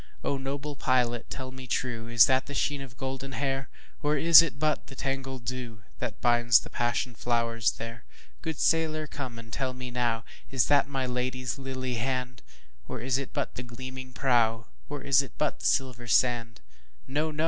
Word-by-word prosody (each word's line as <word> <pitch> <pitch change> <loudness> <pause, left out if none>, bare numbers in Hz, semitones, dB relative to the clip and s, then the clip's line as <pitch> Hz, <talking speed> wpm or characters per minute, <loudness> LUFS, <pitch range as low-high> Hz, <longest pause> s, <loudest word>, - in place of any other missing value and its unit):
O - - 0
noble 140 +2 -4
pilot 125 -3 +1
tell 130 -1 -5
me 130 0 -9
trueIs 120 -2 +3
that 130 -1 +2
the 145 - -6
sheen 145 0 0
of 130 -2 -10
golden 135 0 -4
hair? 135 -1 -1 0.3
Or 150 +1 +2
is 165 +1 +10
it 165 -4 -2
but 155 0 0
the 135 - -10
tangled 135 -2 -3
dewThat 120 -3 -5
binds 120 -1 +5
the - - -11
passion 120 +1 0
flowers 115 -1 +1
there? 115 +1 -7 0.4
Good 160 -4 -3
sailor 155 -1 +2
come 130 -5 -6
and 115 -1 -11
tell 130 -2 -2
me 125 -1 -6
nowIs 120 +1 -1
that 145 0 +5
my 135 -2 -2
Lady's 125 +1 -2
lily 130 -2 -3
hand? 125 0 -2 0.5
Or - - -5
is 130 +3 0
it 140 - -6
but - - -2
the - - -5
gleaming 130 +1 -8
prow, 115 -4 +2 0.2
Or 145 -1 -5
is 140 -1 +5
it 135 - -9
but 150 - 0
the - - 0
silver 125 -3 0
sand? 115 - +2 0.5
No! 150 +3 0
no! 155 0 -7
130 Hz, 180 wpm, -28 LUFS, 120-135 Hz, 0.5 s, is